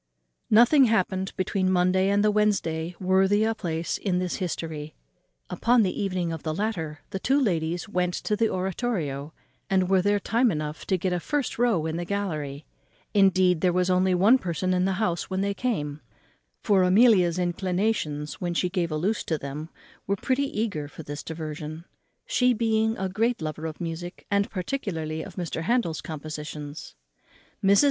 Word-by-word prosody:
_ - - -53 0.5
Nothing 245 +6 +6
happened 190 -4 0
between 185 0 0
the - - +2
Monday 185 +1 +3
and 200 +1 +3
the 210 - +4
Wednesday 180 -6 0
worthy 190 +3 +3
a 225 +1 +2
place 165 -6 -3
in 185 -3 0
this 180 -1 -1
history. 160 -4 -4 0.5
Upon 235 - +3
the 185 - 0
evening 185 -4 -1
of 160 - -6
the 155 -1 -3
latter 165 -8 -3
the 190 - -3
two 270 +8 +2
ladies 175 - 0
went 180 -3 0
to 210 - -1
the 225 +1 +2
oratorio, 180 - -2 0.4
and 185 -2 +2
were 190 -1 +5
there 205 +2 +2
time 235 +5 +2
enough 150 -4 -4
to 190 - +2
get 180 +1 -1
a 180 - 0
first 285 - -2
row 225 -10 +2
in 160 +1 -2
the 175 - -2
gallery. 155 -7 -3 0.5
Indeed, 185 -4 +4
there 180 - +3
was 180 +1 +1
only 185 0 +3
one 210 +9 +5
person 185 0 -1
in 180 0 +2
the 190 - +1
house 180 -4 -1
when 190 0 -1
they 200 0 0
came; 155 - -2 0.6
for 200 -2 +4
Amelia's 185 -2 +5
inclinations, 180 -4 -1
when 175 -1 -2
she 180 - +1
gave 175 -3 -1
a 155 - -1
loose 200 +8 0
to 160 - 0
them, 145 +3 -6 0.4
were 200 - +1
pretty 265 +7 0
eager 200 -10 -2
for 155 +2 -10
this 145 0 -6
diversion, 155 0 -6 0.4
she 250 - +3
being 220 -1 +1
a 190 - -1
great 225 +6 0
lover 155 0 -4
of 155 - -7
music, 175 +1 -6
and 200 0 +2
particularly 175 - -3
of - - -9
Mr. 175 -3 -3
Handel's 215 -5 0
compositions. 150 -1 -7 0.7
Mrs. 195 +1 +5
185 Hz, 180 wpm, -26 LUFS, 160-205 Hz, 0.7 s, Nothing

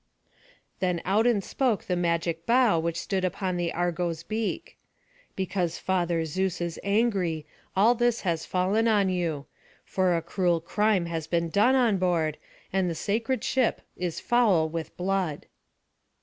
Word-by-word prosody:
Then 180 -2 0
out 210 +5 +3
and 215 -5 +2
spoke 245 -3 0
the 180 - -1
magic 170 -1 -1
bough 235 -7 +4
which 170 +1 -2
stood 190 -2 -2
upon 185 0 -1
the 175 -1 -1
Argo's 175 -1 -2
beak: 220 +4 -4 0.6
"Because 185 -3 -1
Father 175 -3 0
Zeus 185 +3 -1
is 170 -1 -3
angry, 200 -7 +1 0.3
all 210 +5 +5
this 240 -1 +1
has 170 -4 -1
fallen 195 +5 +1
on 205 -4 +3
you; 165 -6 -2 0.4
for 185 -2 +1
a 165 - -3
cruel 175 -1 +1
crime 205 +2 +1
has 165 -2 -4
been 170 -1 0
done 210 +9 +4
on 235 -7 +3
board, 165 -4 0 0.3
and 190 -2 +1
the 165 - -3
sacred 225 +9 -1
ship 260 -3 +1
is 180 -2 -3
foul 210 -10 +3
with 160 0 -6
blood." 185 -4 -1
180 Hz, 150 wpm, -27 LUFS, 170-210 Hz, 0.6 s, all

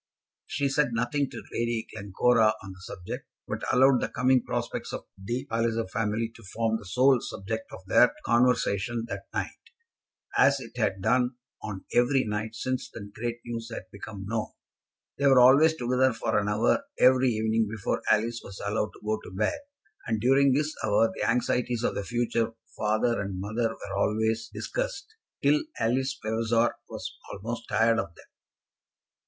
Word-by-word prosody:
She 140 -1 0
said 140 -2 +1
nothing 125 +4 0
to - - -8
Lady 115 -1 -1
Glencora 110 +3 +3
on 100 - -8
the 95 0 -13
subject, 90 -1 -7 0.2
but - - -4
allowed 130 0 +5
the - - -1
coming 130 +1 +3
prospects - - -3
of - - -5
the 120 +6 -4
Palliser 115 -1 0
family 115 +2 -1
to 115 - -15
form 110 0 +1
the - - -13
sole 130 +6 +4
subject 100 - -5
of - - -10
their - - +5
conversation 120 -2 +2
that 100 0 -6
night, - - -3 0.8
as 140 0 +5
it 120 -2 -10
had 95 -5 -1
done 125 +3 +2 0.3
on 100 -3 -6
every 130 +2 +4
night 110 +1 -3
since 130 +2 -2
the 100 -2 -9
great 120 +1 -4
news 115 -1 -5
had 95 -5 -7
become 100 -1 -8
known. 110 +1 -2 0.7
They 140 - +3
were 135 -2 +7
always 140 +6 +7
together 125 -1 +2
for - - -2
an 105 0 -1
hour 110 - +2
every 130 0 +5
evening 110 0 +1
before 110 -2 -2
Alice 115 +2 +2
was 100 - -10
allowed 105 +1 -1
to - - -16
go 110 0 0
to - - -9
bed, 105 - 0 0.5
and 110 -1 0
during 135 +4 +4
this 150 +3 +1
hour 110 +1 +3
the - - -1
anxieties 125 0 0
of - - +1
the 100 - -3
future 115 +1 0 0.2
father 110 +2 +1
and 100 -2 -4
mother 110 +4 -1
were 100 -3 -7
always 110 +3 0
discussed - - -4 0.3
till 145 +1 +4 0.2
Alice 130 +4 0
Vavasor 115 +1 +1 0.2
was - - -6 0.2
almost 115 +4 -6
tired 115 0 +3
of 85 -4 -4
them. - - -16
115 Hz, 170 wpm, -27 LUFS, 110-125 Hz, 0.8 s, were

